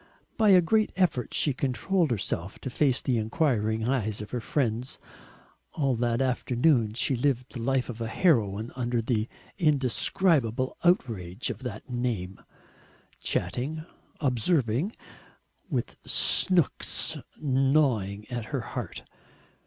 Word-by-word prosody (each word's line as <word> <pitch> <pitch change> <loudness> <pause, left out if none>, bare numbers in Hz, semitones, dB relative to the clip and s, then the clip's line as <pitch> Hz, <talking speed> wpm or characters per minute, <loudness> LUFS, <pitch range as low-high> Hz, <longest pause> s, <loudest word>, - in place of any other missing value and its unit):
By 220 -2 +3
a 185 -2 +8
great 215 +5 +2
effort 175 - +1
she 145 - +1
controlled 140 - 0
herself 100 -4 -3
to 130 - -5
face 135 -1 +2
the 125 -3 +1
enquiring 110 -3 0
eyes 110 -5 0
of 105 - -8
her 125 - -2
friends. 120 -1 -1 0.8
All 140 -4 +1
that 120 +1 0
afternoon 125 -2 +2
she 130 +2 +1
lived 125 0 -1
the 120 - -5
life 130 +1 +1
of 115 -1 -7
a 115 - -1
heroine 110 - +1
under 120 -1 -1
the 115 -1 0 0.3
indescribable 135 - +1
outrage 115 - 0
of - - -8
that 115 -4 -6
name, 120 -7 -3 0.8
chatting, 155 +6 -2 0.3
observing, 135 - +1 0.8
with - - -2
"Snooks" 180 -6 +2 0.2
gnawing 130 -8 +1
at 120 -2 -3
her - - -3
heart. - - -6
125 Hz, 120 wpm, -27 LUFS, 110-145 Hz, 0.8 s, a